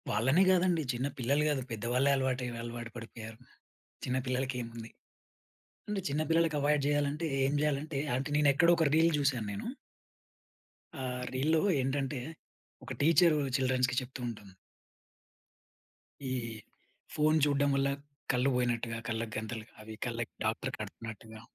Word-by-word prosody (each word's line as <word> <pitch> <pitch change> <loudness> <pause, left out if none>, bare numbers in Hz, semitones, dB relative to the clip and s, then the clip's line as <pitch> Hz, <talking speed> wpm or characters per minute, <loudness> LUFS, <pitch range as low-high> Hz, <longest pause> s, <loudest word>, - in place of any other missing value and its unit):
వాళ్ళనే 130 - +4
గాదండి. 180 -3 +3
చిన్న 125 +3 -1
పిల్లలు 140 +4 +2
గాదు, 145 -3 0
పెద్దవాళ్ళే 120 +5 +1
అలవాటయి, 130 -2 -1
అలవాటు 120 0 -6
పడిపోయారు. 115 -1 -9 0.7
చిన్నపిల్లలకేముంది? 125 -3 -2 1.0
అంటే 210 -1 -1
చిన్నపిల్లలకి 155 +2 +2
అవాయిడ్ 145 0 +2
జేయాలంటే, 145 +2 +1 0.2
ఏం 135 - +1
జేయాలంటే 150 0 0 0.2
అంటే 135 +3 -2
నేనెక్కడో 150 +3 +5
ఒక 160 - +3
రీల్ 165 +1 +5
జూసాను 135 -7 +1
నేను. 100 - -5 1.3
ఆ! - - -3 0.3
రీల్‌లో 155 +5 +2 0.2
ఏంటంటే, 135 +1 -1 0.7
ఒక - - -5
టీచరు 165 +1 +5 0.2
చిల్డ్రన్స్‌కి 130 -1 +1
చెప్తూంటుంది. 120 -6 -7 1.8
ఈ - - -1 0.8
ఫోన్ 155 +1 +4
చూడ్డం 145 -1 +2
వల్ల 135 0 +2 0.4
కళ్ళు 125 +2 +2
వోయినట్టుగా, 120 -2 0
కళ్ళకు 115 -1 -3
గంతలు, 110 0 -5 0.2
అవి 110 0 -8
కళ్ళకి 115 -1 -4
డాక్టర్ - - -1
కడతన్నట్టుగా. 110 -1 -8
130 Hz, 115 wpm, -31 LUFS, 120-150 Hz, 1.8 s, నేనెక్కడో